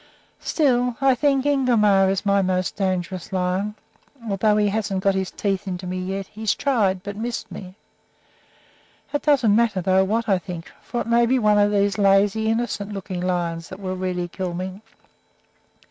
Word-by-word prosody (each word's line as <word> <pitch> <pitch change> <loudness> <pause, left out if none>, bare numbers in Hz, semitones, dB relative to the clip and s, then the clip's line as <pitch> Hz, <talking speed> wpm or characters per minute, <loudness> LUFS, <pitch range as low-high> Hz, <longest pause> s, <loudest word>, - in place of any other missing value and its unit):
Still, 250 -5 +1
I 270 -1 +4
think 275 +1 +1
Ingomar 225 -9 +3
is 195 +2 -1
my 200 0 +3
most 185 -1 -1
dangerous 185 -2 -2
lion, 190 +3 -1 0.5
although 210 +1 +2
he 210 -1 +2
hasn't 195 -2 -2
got 195 - +3
his 190 -1 -2
teeth 200 -1 -2
in 185 -1 -2
me 185 +1 -3
yet; 190 +1 -3
he's 215 0 -2
tried, 200 -9 +1
but 200 0 -6
missed 235 +3 -4
me. 185 -1 -9 1.4
It 290 - 0
doesn't 260 -8 +3
matter, 225 -4 +2
though, 185 +1 +3
what 225 +4 -1
I 195 -3 +3
think, 175 -2 -8
for 240 - -4
it - - -4
may 235 0 +3
be 260 +2 +3
one 210 -3 +3
of 205 0 +4
these 200 0 +1
lazy, 200 +2 +3
innocent 225 -3 -2
looking 190 -2 -5
lions 170 -2 -2
that 185 - -9
will 185 -1 -4
really 180 -1 -2
kill 180 0 -4
me. 185 +2 -5
200 Hz, 175 wpm, -22 LUFS, 185-220 Hz, 1.4 s, I